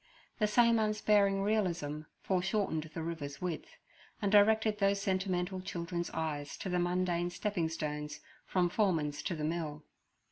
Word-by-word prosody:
The 210 - +3
same 235 +1 +5
unsparing 210 -2 +3
realism 175 -8 0 0.2
foreshortened 185 -4 0
the 165 - -3
river's 155 -4 -5
width, 175 -3 -5 0.4
and 200 -2 0
directed 215 +1 +5
those 200 0 +3
sentimental 185 -1 -1
children's 175 -2 -3
eyes 150 -3 -3
to 190 - -4
the 180 0 +1
mundane 175 0 +1
stepping 180 -2 -1
stones 150 -2 -4 0.3
from 180 -2 +2
Foreman's 165 -7 +1
to 175 - -2
the 155 - -4
mill. 155 -2 -2
180 Hz, 140 wpm, -33 LUFS, 160-200 Hz, 0.4 s, same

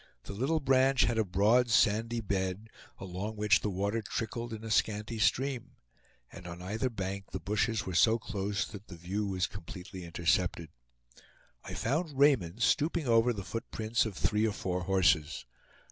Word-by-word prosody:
The - - -7
little 135 +10 0
branch 135 -1 +4
had 115 +1 +1
a - - +4
broad 105 +6 +3
sandy 115 +1 +2
bed, 95 +1 -2 0.3
along 95 +4 -5
which 105 -2 +3
the 105 - -2
water 100 +4 -1
trickled 115 +3 -4
in 110 0 -6
a 110 - -5
scanty 110 +1 0
stream; 130 +2 0 0.6
and 90 - -10
on 85 0 -7
either 105 +8 -2
bank 100 -3 -4
the 95 - -5
bushes 105 +4 0
were 95 - -4
so 110 +7 +5
close 100 -3 -2
that 105 0 -11
the 85 - -10
view 95 +5 -3
was 95 -2 0
completely 95 0 -8
intercepted. 85 -1 0 0.9
I - - -7
found 150 +3 -1
Raymond 120 - +3
stooping 160 -1 +2
over 115 +1 +4
the 100 -4 -4
footprints 110 +4 -1
of 100 - -7
three 105 +1 +2
or 105 - -1
four 90 -2 -3
horses. 90 -5 +2
105 Hz, 165 wpm, -31 LUFS, 95-115 Hz, 0.9 s, so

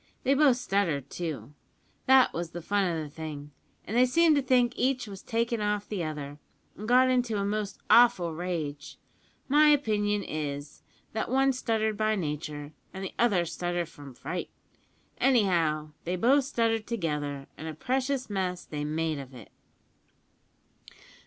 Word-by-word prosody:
They 270 - +3
both 275 -3 +5
stuttered, 175 - -1
too 160 -4 -5 0.5
that 265 0 +6
was 170 0 -3
the 175 - -5
fun 200 +2 +1
o' 165 -3 -1
the - - -7
thing, 145 -1 -7 0.3
and 220 - -4
they 250 +1 +5
seemed 325 +4 +4
to 285 - +3
think 250 -2 +3
each 255 0 0
was 195 -2 -9
takin' 230 0 -1
off 210 0 -1
the 200 -5 -3
other, 145 -2 -5 0.4
and 215 - -7
got 255 +2 +5
into 245 -4 +1
a 200 - -1
most 205 -1 -2
awful 230 -9 +5
rage. 155 -4 -4 0.5
My 300 +2 +5
own 300 - +7
opinion 210 -6 +1
is, 145 -3 -5 0.3
that 220 - -2
one 270 +1 +3
stuttered 220 -4 -1
by 215 0 +1
nature, 150 -3 -4 0.2
an' 190 - -5
the 190 - -5
other 200 -8 +3
stuttered 175 0 -3
from 145 -5 -12
fright. - - -5 0.7
Anyhow, 170 - +2
they 175 +2 -2
both 260 +8 +3
stuttered 225 -4 0
together, 150 -9 -3
and 160 - -8
a 160 - -5
precious 260 - -1
mess 185 -3 -2
they 150 -1 -5
made 155 0 -1
of 135 -1 -10
it. 115 -5 -12
195 Hz, 160 wpm, -28 LUFS, 155-240 Hz, 0.7 s, own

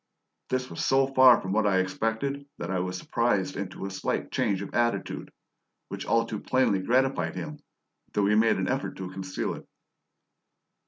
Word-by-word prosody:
This 130 0 -1
was - - -5
so 135 0 +4
far 130 -2 +7
from 95 - -5
what 105 +1 +2
I 100 - +3
had 95 - +4
expected 115 +9 -2
that 85 - -4
I 95 - 0
was 90 0 -2
surprised 105 -2 0
into 100 0 -5
a 100 - -4
slight 95 -1 -2
change 100 -1 0
of - - -9
attitude, 120 0 -1 0.6
which - - -6
all 115 0 +3
too 110 -2 -4
plainly 130 -7 +2
gratified 130 +6 +1
him, 150 -1 -6 0.5
though 105 - +2
he 105 - +3
made 110 +1 +4
an 95 -1 -1
effort 135 +2 -2
to 95 -1 -6
conceal 95 0 -3
it. - - -10
110 Hz, 180 wpm, -27 LUFS, 95-130 Hz, 0.6 s, far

